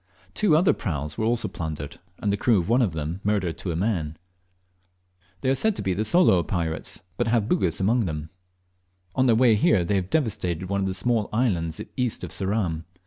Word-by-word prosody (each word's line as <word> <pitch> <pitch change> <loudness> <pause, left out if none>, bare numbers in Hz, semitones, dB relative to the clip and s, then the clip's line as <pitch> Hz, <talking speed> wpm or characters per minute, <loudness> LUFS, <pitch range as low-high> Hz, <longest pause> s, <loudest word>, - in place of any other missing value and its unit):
Two 185 -8 +3
other 175 +3 +4
prams 75 - -3
were 110 - -1
also 115 +1 0
plundered, 75 -3 -6 0.2
and 100 -1 -1
the - - +3
crew 115 +2 +3
of 85 - -3
one 120 +3 +4
of 105 -9 +1
them 80 +4 -4
murdered 100 -5 0
to 90 - -3
a - - -3
man. 85 -5 -1 1.2
They 130 - 0
are - - +4
said 220 +9 +1
to - - -4
be 95 -1 0
Sooloo 110 - +4
pirates, 80 -1 -3
but 120 - 0
have 115 -2 +1
Bugis 90 -7 +1
among 110 +4 +2
them. 80 -2 -5 0.8
On 130 0 +2
their 115 - +5
way 120 0 +5
here 105 -2 +3
they 100 +4 0
have 95 -1 -2
devastated 95 - -1
one 100 0 0
of 95 - 0
the 95 - -1
small 110 +2 0
islands 90 -9 0 0.2
east 125 -3 -1
of - - -6
Ceram. 95 -5 -1
100 Hz, 200 wpm, -25 LUFS, 85-115 Hz, 1.2 s, their